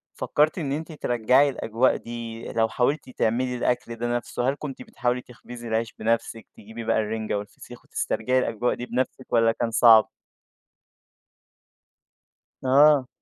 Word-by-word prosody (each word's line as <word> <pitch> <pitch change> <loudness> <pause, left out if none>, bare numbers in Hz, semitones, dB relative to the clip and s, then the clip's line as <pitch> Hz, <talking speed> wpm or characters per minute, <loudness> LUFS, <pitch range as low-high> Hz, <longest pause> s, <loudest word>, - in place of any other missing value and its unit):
فكرتِ 150 +3 +1
إن 150 -6 -3
أنتِ 160 +4 -4
ترجَّعي 130 -1 +2
الأجواء 125 -1 +1
دي 115 -1 -7
لو 115 -1 +2
حاولتِ 135 +4 -1
تعملي 125 +1 0
الأكل 120 -1 -1
ده 120 +1 -2
نفسه، 120 +1 -2
هل 135 - -1
كنتِ 140 -4 -7
بتحاولي 125 0 -2
تخبزّي 120 -1 -11
العيش 115 0 -1
بنفسِك، 115 0 -1
تجيبي 110 +3 -9
بقى 115 0 +1
الرنجة 110 -1 -2
والفسيخ 105 +4 -10
وتسترجعي 125 +4 0
الأجواء 120 0 -1
دي 120 - -6
بنفسِك 130 +1 -3
والّا 115 -1 +4
كان 115 0 -2
صعب؟ 110 -1 +6 2.5
آه. 140 +1 +5
120 Hz, 135 wpm, -25 LUFS, 115-130 Hz, 2.5 s, صعب